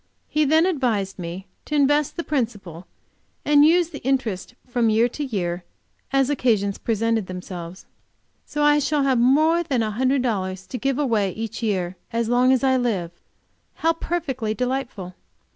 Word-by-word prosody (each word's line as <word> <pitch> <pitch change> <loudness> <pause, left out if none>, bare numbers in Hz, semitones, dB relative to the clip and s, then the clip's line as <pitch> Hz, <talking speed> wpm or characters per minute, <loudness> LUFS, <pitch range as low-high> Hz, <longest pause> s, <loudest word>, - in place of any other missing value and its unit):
He 305 0 +1
then 315 +4 +4
advised 235 - -1
me 175 +2 -6 0.2
to 300 - -3
invest 290 +2 +2
the 340 - -2
principal, 205 - -3 0.6
and 290 -1 +6
use 340 +2 +4
the 290 - -8
interest 250 -5 -2
from 240 -2 +1
year 225 +2 +3
to 295 - -5
year, 180 -9 -3 0.5
as 270 -1 +3
occasions 215 -7 +1
presented 225 -2 0
themselves. 180 -1 -8 0.6
So, 295 - -2
I 295 0 +5
shall 290 0 +1
have 265 -3 +2
more 310 +7 +4
than 270 -9 0
a 215 - -2
hundred 255 +4 +1
dollars 190 -5 -2
to 250 - -6
give 270 +2 0
away 225 -9 +1
each 225 +1 -5
year, 185 -5 -1
as 230 -1 -1
long 250 +1 +4
as 260 0 +2
I 260 -1 +3
live! 205 -9 -1 0.6
How 330 +1 +1
perfectly 270 -10 -3
delightful! 250 -7 -3
245 Hz, 160 wpm, -23 LUFS, 200-285 Hz, 0.6 s, and